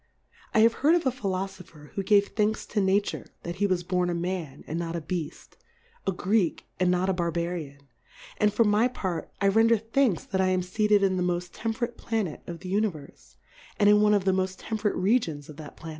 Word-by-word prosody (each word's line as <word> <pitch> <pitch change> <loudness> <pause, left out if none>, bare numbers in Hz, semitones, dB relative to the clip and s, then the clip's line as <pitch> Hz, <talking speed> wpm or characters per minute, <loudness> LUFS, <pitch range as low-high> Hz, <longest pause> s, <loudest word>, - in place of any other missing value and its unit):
I 215 - +6
have 225 +1 +6
heard 310 +5 +5
of 345 - 0
a 260 - +3
Philofopher, 190 - -5
who 195 - -2
gave 200 0 +3
Thanks 215 0 0
to 210 - -1
Na 190 +1 +4
ture - - -6 0.2
that 170 +1 -5
he 205 +1 +2
was 185 -2 0
born 180 0 0
a 175 - -1
Man 170 -4 -4
and 160 +3 -3
not 170 0 -3
a - - -1
Beaft, 160 0 -6 0.5
a - - +3
Greek 190 -1 0
and 185 -1 +3
not 180 +1 +1
2i 190 - +1
Barbarian; 170 -5 -3 0.5
and 210 0 +3
for 210 +3 +3
my 210 +2 +3
Part, 185 -9 -4
I 200 - +4
render 225 +3 +4
Thanks 225 -1 +1
that 190 -1 -1
I 190 - +2
am 185 -1 +1
feated 210 +2 +2
in 190 -1 +2
the - - 0
moft 175 0 -1
temperate 235 +1 -3
Pla 225 -2 -1
net 160 -6 -6
of 170 -1 -7
the 185 0 -5
Uaiverfe, 155 - -3 0.4
and 205 - +5
in 210 0 +6
one 210 0 +5
of 195 -2 0
the 190 - +4
moft 185 0 0
temperate 215 -2 -2
Regions 185 - 0
of 150 - -10
that 155 -2 -10
Planet. 165 - -9
190 Hz, 220 wpm, -27 LUFS, 175-210 Hz, 0.5 s, I